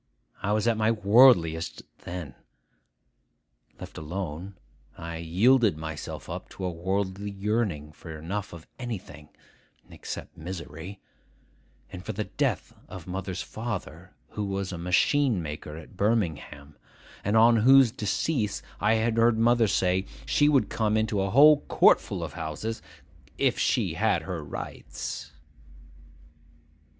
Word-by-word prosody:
I 100 - -1
was 110 +2 +1
at 115 -1 +2
my 110 0 +2
worldliest 100 -7 +4 0.2
then. 85 -6 -6 1.5
Left - - -9
alone, 90 +3 -5 0.4
I 85 0 -6
yielded 100 +5 +3
myself 80 -1 -6
up - - -6
to 95 - -6
a 90 - -1
worldly 95 +3 -2
yearning 100 -7 -2
for 80 +1 -10
enough 95 +6 -4
of 85 -2 -11
anything 90 - -7 0.6
(except - - -8
misery), 85 +2 -8 0.9
and 90 -1 -8
for 110 - -4
the 105 +2 -2
death - - -2
of 90 -4 -9
mother's 95 0 -4
father, 95 -6 -6
who 105 - -4
was 100 -1 -3
a 90 - -6
machine 110 +7 +2
maker 75 -1 -6
at 80 +4 -12
Birmingham, 80 -9 -1 0.5
and 105 +3 +2
on 115 +1 +6
whose 130 +2 +6
decease, 110 +1 -1 0.2
I 105 +2 +3
had 110 +1 0
heard 115 0 +4
mother 115 0 +4
say, 95 0 +1 0.2
she 145 0 +3
would 140 -3 +3
come 110 -1 +1
into 110 -2 0
a 95 - 0
whole 145 +6 +7
courtful - - +3
of - - -6
houses 110 +9 -4 0.6
'if - - +1
she - - +1
had - - +1
her - - -5
rights. 70 +2 -7
100 Hz, 130 wpm, -27 LUFS, 85-110 Hz, 1.5 s, whole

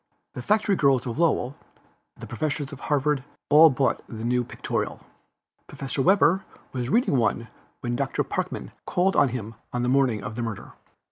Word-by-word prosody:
The - - -6
factory 210 - +2
girls 135 -7 +3
of 120 +3 -4
Lowell, 145 -5 +1 0.6
the - - -9
professors 150 -2 -3
of 140 - -9
Harvard, 145 -2 0 0.3
all 155 +2 +9
bought 135 -1 0
the 110 0 -6
new 125 +1 +1
Pictorial. - - -3 0.7
(Professor 135 0 -3
Webster 190 +2 +4 0.3
was 125 -1 -3
reading 230 - +2
one 115 0 0 0.3
when 120 0 -2
Doctor - - -1
Parkman - - -4 0.2
called 185 +2 +1
on 140 - +4
him 115 -3 -5 0.2
on 125 0 -2
the 125 - +1
morning 125 -6 +2
of 105 - -5
the 120 - -4
murder.) 115 -4 -5
135 Hz, 165 wpm, -25 LUFS, 120-155 Hz, 0.7 s, all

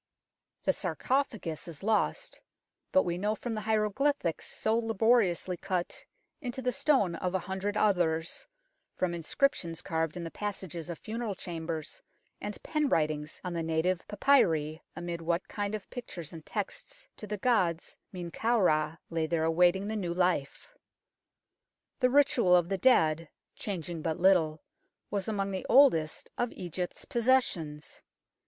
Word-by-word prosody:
The - - +3
sarcophagus 230 - -1
is 165 0 -9
lost, 220 +1 0 0.5
but 280 - +5
we 175 0 -2
know 210 +3 0
from 235 +1 -4
the 215 - -3
hieroglyphics 215 - 0
so 220 +1 0
laboriously 225 -5 +2
cut 180 -1 -3 0.4
into 250 -2 -4
the 250 -1 0
stone 275 - +2
of 180 +2 -2
a 190 - -1
hundred 195 +2 -2
others, 175 - +1 0.5
from 180 -2 0
inscriptions 170 - 0
carved 160 0 -1
in 175 - -4
the 165 - -5
passages 190 -5 -5
of 170 - -4
funeral 220 0 -4
chambers 165 -3 -5 0.4
and 210 0 -5
pen 305 -2 0
writings 150 -3 0
on 180 -1 -3
the 170 - -1
native 165 +3 0
papyri, 165 - +3
amid 170 0 -4
what 170 +2 -1
kind 205 0 -2
of 210 - -7
pictures 175 - -7
and 160 -2 -10
texts - - -5
to 210 - -8
the 210 +1 -3
gods 185 -7 +1 0.2
Men 175 -3 -6
kau 230 +5 +1
Ra 155 -3 +2
lay 165 -1 0
there 160 -1 0
awaiting 175 +4 +3
the 220 - -2
new 175 -5 -2
life. 180 - 0 1.3
The 250 -2 +4
ritual 250 -9 +5
of 175 -1 +3
the 195 - 0
dead, 165 - +4 0.3
changing 175 -5 -4
but 160 +1 -2
little, 165 -5 +3 0.5
was 200 -2 -2
among 200 -2 -1
the 190 - -4
oldest 205 - +4
of 240 -1 0
Egypt's 180 0 -5
possessions. 235 - 0
185 Hz, 150 wpm, -30 LUFS, 165-220 Hz, 1.3 s, but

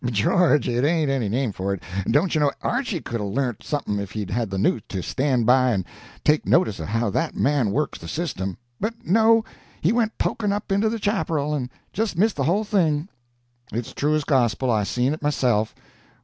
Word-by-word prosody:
'George! 130 - +3
it 120 +1 0
ain't 155 -1 +2
any 125 -7 0
name 125 +2 0
for 100 +1 -2
it. 95 - -13 0.2
Dontchuknow, 150 -2 +3
Archy 240 - -1
could 115 -2 -4
've - - -2
learnt 120 +3 -2
something 135 -9 -2
if 100 -2 -6
he'd 105 -3 -4
had 115 0 -1
the 95 - -3
nous 105 +3 +2
to 95 -3 -3
stand 130 - 0
by 130 +2 +5
and 95 -6 0 0.4
take 150 0 +3
notice 170 - +2
of 80 - -4
how 115 0 0
that 165 +9 -1
man 135 -6 +2
works 150 +9 -1
the - - -9
system. 95 - -3 0.2
But 225 +3 -4
no; 225 +4 +4 0.3
he 170 - +2
went 225 -2 0
poking 210 -3 0
up 205 0 -4
into 200 +3 +2
the 230 - -2
chaparral 165 -8 0
and 130 -4 -2 0.2
just 215 -4 -1
missed 210 0 +2
the 135 - 0
whole 190 +8 +2
thing." 170 -6 +1 0.6
"It's 115 +1 -4
true 150 +2 +1
as 155 - 0
gospel; 130 -3 +2
I 105 -2 +1
seen 125 +6 0
it 155 - -6
myself. 125 -7 +1
140 Hz, 200 wpm, -23 LUFS, 115-175 Hz, 0.6 s, by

